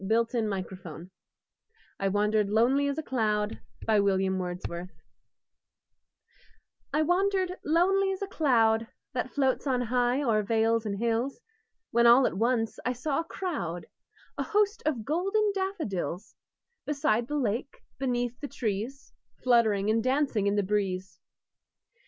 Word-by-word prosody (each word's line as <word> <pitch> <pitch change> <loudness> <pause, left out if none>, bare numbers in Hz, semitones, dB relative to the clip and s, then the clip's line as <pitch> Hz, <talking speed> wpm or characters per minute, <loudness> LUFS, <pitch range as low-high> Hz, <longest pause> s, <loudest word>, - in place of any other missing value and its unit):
William 225 +2 +1
Wordsworth 185 -3 -6 0.9
I 195 - 0
Wandered 210 +1 +1
Lonely 250 +7 +3
As 280 +1 -2
a 315 - -2
Cloud 215 -5 -1 0.3
I 220 -2 +4 2.9
WANDERED 370 +4 +1
lonely 380 +5 +3
as 385 - -4
a - - -3
cloud 230 - +2 0.3
That 255 0 -2
floats 265 +2 0
on 255 -2 +1
high 245 +3 +1
o'er 220 -5 +2
vales 225 +1 +1
and 200 -1 -2
hills, 235 +4 -1 0.5
When 235 0 +4
all 245 +2 +7
at - - 0
once 225 +1 0
I 250 - 0
saw 275 +4 -1
a - - -1
crowd, 285 - -4 0.5
A - - +1
host, 420 +1 +1
of 245 -8 -1
golden 390 - +1
daffodils; 315 - -3 0.5
Beside 260 -6 +1
the 295 - -2
lake, 245 +1 -2 0.2
beneath 245 -2 -1
the 290 - -5
trees, 245 0 -4 0.3
Fluttering 220 -5 +3
and 225 0 +1
dancing 255 -6 +1
in 200 - +2
the 205 - +2
breeze. 190 -2 -2
240 Hz, 130 wpm, -28 LUFS, 215-290 Hz, 2.9 s, all